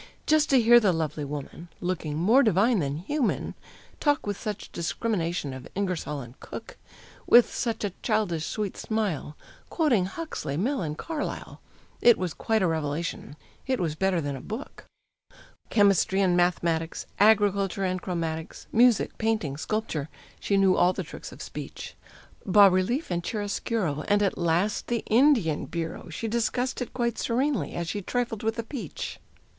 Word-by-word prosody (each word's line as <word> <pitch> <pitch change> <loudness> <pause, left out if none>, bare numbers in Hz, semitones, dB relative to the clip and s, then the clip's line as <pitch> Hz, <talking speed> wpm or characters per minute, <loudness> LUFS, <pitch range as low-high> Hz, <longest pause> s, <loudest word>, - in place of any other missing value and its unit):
Just 310 -1 +3
to 270 - +5
hear 240 +1 +7
the 205 -5 +3
lovely 155 -3 -2
woman, 145 +4 -7
looking 170 -4 -2
more 220 - +5
divine 220 0 +3
than 140 -2 -1
human, 265 - -1 0.5
Talk 290 -2 +1
with 205 -1 -2
such 210 -3 -5
discrimination 170 - -2
of 130 -1 -8
Ingersoll 180 -7 -2
and 120 0 -12
Cook, - - -9 0.5
With 240 0 +6
such 230 -3 -2
a 205 - -1
childish, 205 -8 0
sweet 210 -3 -3
smile, 200 -9 -2 0.3
quoting 260 - +2
Huxley, 195 - -5
Mill, 245 - 0
and 155 -3 -3
Carlyle 320 -3 -5 0.4
It 240 -1 +7
was 180 -3 -2
quite 220 -2 0
a - - +3
revelation 160 -1 -3 0.3
it 260 -1 0
was 165 -4 0
better 190 +2 +1
than 145 -3 -3
a 130 - -7
book. 225 +7 -7 0.8
Chemistry 195 -2 +3
and 180 -2 +3
mathematics, 170 -2 0
agriculture 200 -2 +3
and 185 -1 -1
chromatics, 165 -3 -4
Music, 240 -1 +4
painting, 220 -11 0
sculpture 160 -4 -3 0.3
she 200 - +1
knew 195 -1 +4
all 180 +1 +4
the - - -3
tricks - - -9
of - - -9
speech; - - -8 0.5
Bas 200 0 +7
relief 190 - 0
and 175 0 0
chiaroscuro, 205 -5 -2
and 205 0 +3
at 195 - +1
last 175 +5 0
the 235 -1 -1
Indian 230 - +4
Bureau 165 0 -5
She 225 - -4
discussed 240 +3 -1
it 250 - -4
quite 235 -2 -1
serenely, 250 - 0
as 170 -1 -3
she 205 +4 -3
trifled 240 +1 -2
with 225 +1 -1
a 230 - -2
peach. 225 - -6
195 Hz, 160 wpm, -27 LUFS, 165-230 Hz, 0.8 s, hear